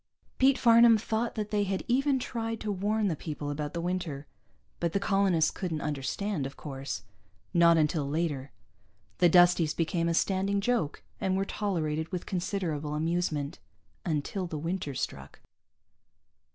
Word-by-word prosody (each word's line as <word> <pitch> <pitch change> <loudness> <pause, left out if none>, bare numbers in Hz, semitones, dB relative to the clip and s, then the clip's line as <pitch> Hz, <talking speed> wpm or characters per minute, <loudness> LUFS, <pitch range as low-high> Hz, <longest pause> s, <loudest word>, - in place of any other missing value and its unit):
Pete 265 0 +5
Farnam 230 -1 +7
thought 225 +2 -2
that 210 -1 -3
they 205 -1 +2
had 195 -1 -2
even 270 +3 +2
tried 225 -3 -3
to 215 - -2
warn 205 +2 0
the 170 - 0
people 150 -1 -5
about 150 +1 -4
the 170 - -1
winter. 175 -5 -3 0.5
But 170 -1 -1
the 200 - +2
colonists 195 -5 +2
couldn't 165 -5 -3
understand, 150 +3 -2
of 135 - -12
course. 135 -6 -5 0.5
Not 170 -1 +6
until 150 -2 +1
later. 145 -4 -2 0.7
The 175 - +6
Dusties 175 -2 +5
became 165 0 0
a 165 - +1
standing 195 +2 +1
joke, 200 -8 -1 0.2
and 190 0 0
were 195 - 0
tolerated 160 -7 -2
with 180 -2 -4
considerable 170 -5 -2
amusement 155 -2 -1 0.4
until 170 +4 -2
the 160 - -5
winter 165 -2 -3
struck. 70 - -5
175 Hz, 150 wpm, -29 LUFS, 150-200 Hz, 0.7 s, Farnam